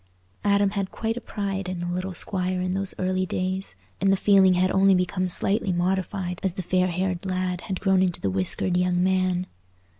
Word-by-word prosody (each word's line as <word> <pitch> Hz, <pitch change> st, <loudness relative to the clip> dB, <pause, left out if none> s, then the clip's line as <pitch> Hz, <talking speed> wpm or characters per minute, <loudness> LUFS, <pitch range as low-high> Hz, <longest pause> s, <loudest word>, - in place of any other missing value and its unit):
Adam 200 Hz, -1 st, +3 dB
had 200 Hz, -2 st, -2 dB
quite 225 Hz, 0 st, -3 dB
a 245 Hz, -, -6 dB
pride 195 Hz, -4 st, -4 dB
in 185 Hz, -, -4 dB
the 175 Hz, -, -4 dB
little 180 Hz, +1 st, -3 dB
squire 185 Hz, -1 st, +1 dB
in 185 Hz, 0 st, -1 dB
those 195 Hz, 0 st, -2 dB
early 185 Hz, 0 st, 0 dB
days, 185 Hz, +1 st, -3 dB, 0.3 s
and 195 Hz, 0 st, +3 dB
the 195 Hz, -, +3 dB
feeling 190 Hz, -2 st, +5 dB
had 185 Hz, +1 st, +2 dB
only 195 Hz, 0 st, +4 dB
become 180 Hz, 0 st, 0 dB
slightly 195 Hz, +2 st, +1 dB
modified 180 Hz, 0 st, -1 dB
as 190 Hz, -2 st, -2 dB
the 185 Hz, -, -4 dB
fair 185 Hz, +1 st, +1 dB
haired 185 Hz, 0 st, -2 dB
lad 185 Hz, -1 st, -2 dB
had 190 Hz, -, -2 dB
grown 190 Hz, -2 st, +2 dB
into 180 Hz, -2 st, 0 dB
the 100 Hz, -, -1 dB
whiskered 95 Hz, -, +1 dB
young 180 Hz, 0 st, +1 dB
man. 185 Hz, -1 st, +1 dB
185 Hz, 200 wpm, -25 LUFS, 180-195 Hz, 0.3 s, feeling